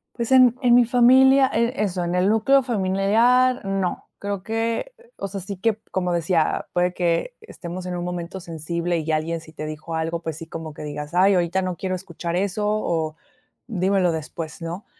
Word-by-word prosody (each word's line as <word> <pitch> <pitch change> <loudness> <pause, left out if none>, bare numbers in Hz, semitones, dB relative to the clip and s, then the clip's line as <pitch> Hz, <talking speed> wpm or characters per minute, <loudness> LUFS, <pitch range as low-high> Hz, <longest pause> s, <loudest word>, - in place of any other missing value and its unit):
Pues 235 +1 -3
en 255 -2 +6
en 245 -1 +4
mi 245 -1 +6
familia, 260 +3 +6
e 235 +2 +1
eso 180 -3 -2
en 175 +1 -2
el 180 +1 +2
núcleo 260 +6 +4
familiar, 230 +4 +2
no, 195 -2 -2
creo 200 -1 -3
que, 225 - -2 0.2
o - - -4
sea, 195 0 -6
sí 190 +1 -6
que 220 +2 0
como 180 -1 -1
decía, 170 -1 0
puede 180 0 +1
que 175 - -1
estemos 185 - -8
en 180 -1 -4
un 175 - -3
momento 175 +1 -5
sensible 170 +1 -3
y 160 0 -2
alguien 160 +2 -1
si 160 0 -15
te 155 - -6
dijo 155 +2 -7
algo, 165 +1 -2
pues 160 -2 -5
sí, 165 - -9
como 160 -2 -7
que 150 - -9
digas: 150 +1 -6
"Ay, 190 +2 +4
ahorita 175 +2 +1
no 185 -1 -2
quiero 185 +1 -3
escuchar 170 -1 -5
eso" 200 +2 -1
o 165 -7 -1 0.5
"Dímelo 190 -4 +1
después", 160 +1 -6
¿no?, 170 +4 -6
185 Hz, 190 wpm, -23 LUFS, 170-220 Hz, 0.5 s, en